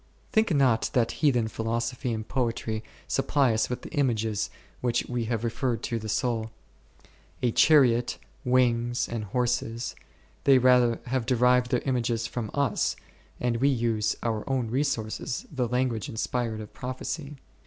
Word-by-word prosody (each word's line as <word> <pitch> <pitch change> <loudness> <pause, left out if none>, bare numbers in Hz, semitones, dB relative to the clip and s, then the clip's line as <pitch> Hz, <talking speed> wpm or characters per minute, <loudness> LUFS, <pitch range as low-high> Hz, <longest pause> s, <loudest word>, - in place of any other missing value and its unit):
Think 220 -2 +3
not 130 -5 +3
that 120 -2 +2
heathen 125 -7 +3
philosophy 115 +3 -2
and 110 -1 -4
poetry 115 -3 -2 0.2
supply 135 -5 +2
us 110 - +1
with 125 - -4
the - - -9
images 115 -8 0 0.3
which 120 -1 0
we 120 -2 -2
have 115 -1 -2
referred 120 +1 -1
to 115 - -2
the 110 0 -6
soul, 115 -1 0 0.9
a 120 - +3
chariot, 125 -4 +4 0.3
wings 120 -1 +2
and 115 -2 -4
horses: 120 +1 -1 0.5
they 135 -2 +7
rather 125 -2 +4
have 125 -1 -1
derived 125 0 +3
their 125 -1 +1
images 120 -3 0
from 115 -2 -4
us, 140 -5 +1 0.4
and 120 -1 0
we 135 +4 +3
use 115 -4 +1
our 110 -2 -1
own 125 -4 0
resources, 125 -4 -2
the 130 -4 -1
language 125 -3 0
of - - -6
inspired 110 -2 -3
prophecy. 140 +3 -5
120 Hz, 145 wpm, -27 LUFS, 115-130 Hz, 0.9 s, they